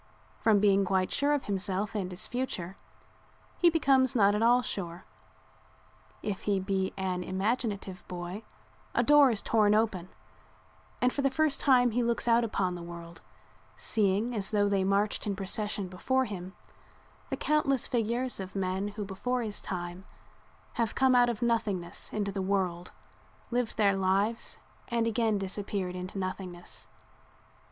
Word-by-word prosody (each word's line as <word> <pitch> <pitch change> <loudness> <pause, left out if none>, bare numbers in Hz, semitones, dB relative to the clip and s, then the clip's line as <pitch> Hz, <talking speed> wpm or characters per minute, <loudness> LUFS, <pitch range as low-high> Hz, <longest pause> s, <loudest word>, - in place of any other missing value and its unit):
From 220 -2 +4
being 200 -1 +4
quite 185 -1 +1
sure 285 +1 +1
of 290 -2 +1
himself 195 0 -1
and 195 -4 -2
his 180 -1 -3
future 210 -8 -3 0.8
he 350 - +6
becomes 275 -5 +3
not 205 -3 +5
at 210 - 0
all 245 +2 +5
sure. 175 -4 -4 1.2
If 205 -3 -4
he 200 -1 +2
be 190 0 -1
an 185 -1 -2
imaginative 195 -1 -2
boy 180 +3 -6 0.5
a - - +3
door 295 -2 +7
is 220 -4 -1
torn 210 -2 +3
open 205 -5 0 0.9
and 250 - +3
for 280 - -1
the 275 - +3
first 285 +1 +1
time 250 -3 +5
he 245 +3 +1
looks 235 0 0
out 235 0 +5
upon 190 -5 0
the 175 - -6
world, 170 -1 -9 0.6
seeing, 210 +3 +1
as 200 -3 -1
though 205 -1 +2
they 200 -1 +1
marched 200 +2 +1
in 200 - -1
procession 200 +1 -2
before 260 +9 0
him, 190 -3 -7 0.7
the - - -2
countless 275 -4 +1
figures 240 +1 -1
of 190 0 -7
men 190 +1 -1
who 205 0 -5
before 245 +6 -2
his 210 -2 -4
time 175 +1 -5 0.8
have 225 - -1
come 265 -1 +4
out 245 -1 +5
of 235 0 -3
nothingness 205 -7 -1
into 205 -2 -2
the 195 0 -3
world, 185 -2 -1 0.6
lived 245 -1 -1
their 200 -2 +4
lives 195 +4 0 0.3
and 235 -2 0
again 225 -2 +1
disappeared 195 -1 -3
into 185 +2 -6
nothingness. 185 -2 -6
205 Hz, 155 wpm, -29 LUFS, 190-235 Hz, 1.2 s, door